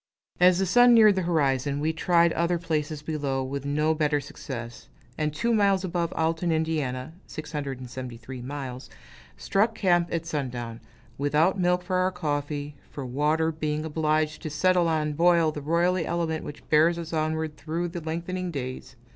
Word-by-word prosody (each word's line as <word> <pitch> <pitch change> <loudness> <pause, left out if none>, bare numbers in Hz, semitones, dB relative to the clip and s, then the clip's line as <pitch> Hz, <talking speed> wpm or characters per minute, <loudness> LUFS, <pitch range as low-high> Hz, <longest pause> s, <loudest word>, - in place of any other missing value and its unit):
As 180 0 +6
the 195 - +1
sun 245 +5 +6
neared 215 -2 +7
the 190 - -1
horizon, 145 -5 +1
we 155 +2 0
tried 170 0 +3
other 170 +1 +1
places 155 -3 -2
below, 140 -4 -2
with 140 +1 -4
no 150 +2 +2
better 150 -1 +1
success; 120 -4 -8 0.3
and 150 0 -1
two 230 +11 0
miles 200 -3 +3
above 170 -2 -1
Alton, 165 +1 0
Ind. 160 0 +2 0.6
(673 130 -5 -6
miles), 130 -1 -6 0.5
struck 220 +3 +1
camp 175 -4 +2
at 165 -1 -2
sundown, 125 -7 -4 0.4
without 150 +7 +2
milk 180 0 +2
for 185 0 -1
our 185 +1 +2
coffee 145 -4 -3 0.2
for 140 - -6
water, 150 +5 +1
being 155 -1 -2
obliged 155 -1 0
to 155 - -4
settle 175 +3 +2
and 150 -2 0
boil 170 -1 +4
the 150 - -6
roily 170 +4 +1
element 165 -2 -1
which 145 - -9
bears 160 +3 +5
us 165 -1 -6
onward 155 0 -1
through 165 +4 -3
the 175 0 -6
lengthening 170 +3 -3
days. 130 -3 -6
160 Hz, 160 wpm, -26 LUFS, 145-175 Hz, 0.6 s, neared